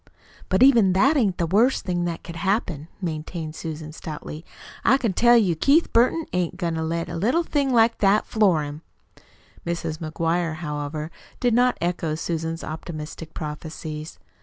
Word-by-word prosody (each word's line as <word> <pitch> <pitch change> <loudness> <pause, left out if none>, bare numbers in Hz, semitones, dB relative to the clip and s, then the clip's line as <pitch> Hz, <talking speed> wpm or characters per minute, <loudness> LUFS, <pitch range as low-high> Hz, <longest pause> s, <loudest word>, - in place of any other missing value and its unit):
"But 190 +6 +4
even 230 -9 +6
that 265 +11 +4
ain't 210 -10 +2
the 170 - +1
worst 220 +10 +2
thing 175 -1 -1
that 170 -1 -4
could 170 -1 -8
happen," 175 -5 -1 0.2
maintained 160 -1 -4
Susan 160 -1 -6
stoutly. 155 0 -7 0.4
"I 265 - +5
can 230 -8 -1
tell 240 +4 +6
you 190 -7 +3
Keith 285 - +3
Burton 255 +8 +3
ain't 180 0 -1
goin' 170 -3 -1
to 160 - -2
let 165 +1 -2
a - - -6
little 245 - +1
thing 285 -4 0
like 230 -1 +4
that 200 +1 +3
floor 190 -8 +2
him!" 145 +1 -7 0.8
Mrs. 165 -2 -3
McGuire, 165 +1 -1
however, 150 0 -4 0.3
did 245 -2 +2
not 245 +1 +3
echo 170 -2 -1
Susan's 165 0 -3
optimistic 160 0 -7
prophecies. 155 0 -6
170 Hz, 160 wpm, -24 LUFS, 160-220 Hz, 0.8 s, even